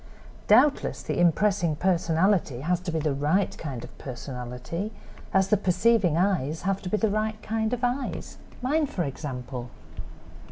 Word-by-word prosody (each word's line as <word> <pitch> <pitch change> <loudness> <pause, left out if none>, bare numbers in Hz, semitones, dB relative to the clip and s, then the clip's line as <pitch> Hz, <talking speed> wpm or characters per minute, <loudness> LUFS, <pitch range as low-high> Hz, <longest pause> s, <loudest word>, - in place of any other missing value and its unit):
Doubtless 260 +7 +4
the - - -2
impressing 175 -1 +3
personality 170 -4 +1
has 175 +4 +1
to 180 -1 -4
be 160 - -1
the 155 -2 0
right 150 +8 +1
kind 135 -7 -5
of - - -11
personality 125 - -5 0.4
as 190 0 +3
the 210 - +4
perceiving 190 -2 +3
eyes 165 -5 0
have 195 +1 0
to 180 - -5
be 215 - +1
the 220 - +2
right 215 +1 -1
kind 220 0 -1
of 245 -1 -2
eyes—mine, 260 +3 -2
for 180 - -2
example." 130 -4 -5
180 Hz, 150 wpm, -26 LUFS, 150-210 Hz, 0.4 s, Doubtless